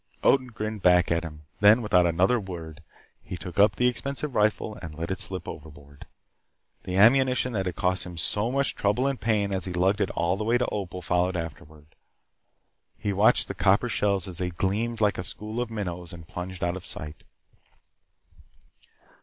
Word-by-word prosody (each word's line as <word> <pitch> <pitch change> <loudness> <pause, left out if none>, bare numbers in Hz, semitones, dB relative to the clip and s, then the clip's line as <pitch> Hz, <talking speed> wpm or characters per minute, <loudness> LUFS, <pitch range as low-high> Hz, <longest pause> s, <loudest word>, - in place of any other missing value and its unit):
Odin 130 -2 +4
grinned 110 -3 -5
back 90 -1 +4
at 85 0 +1
him. 75 -2 -9 0.2
Then, 105 +4 +6
without 90 -4 +4
another 95 +8 +2
word, 85 -4 -8 0.4
he 90 - -7
took 90 +4 -7
up 100 0 +5
the 125 - +1
expensive 140 +3 -2
rifle 105 0 +1
and 80 -3 -8
let 85 +3 -4
it 95 - -3
slip 95 -1 -1
overboard. 70 -2 -11 0.8
The 90 0 -2
ammunition 125 +3 +4
that 95 -3 -1
cost 90 0 0
him 90 -1 -9
so 105 +8 0
much 140 +1 0
trouble 105 +6 0
and 140 -2 -1
pain 105 -3 +1
as 95 - -1
he 90 - -4
lugged 95 +4 +1
it 95 - +1
all 85 +3 +1
the 105 - -3
way 115 +3 +2
to 125 - 0
Opal 90 -3 -4
followed 90 +2 +1
after. 80 -3 -6 1.3
He 105 - -2
watched 100 +3 +4
the - - -4
copper - - +2
shells 100 -3 0
as 90 -2 -9
they 90 -1 -1
gleamed 105 +6 -2
like 105 -3 +2
a - - -2
school 110 +6 -4
of 120 - -3
minnows 90 -6 -5
and 85 -2 -11
plunged 90 0 -6
out 85 +1 0
of 95 - -7
sight. 75 -4 -7
95 Hz, 185 wpm, -26 LUFS, 90-110 Hz, 1.3 s, Then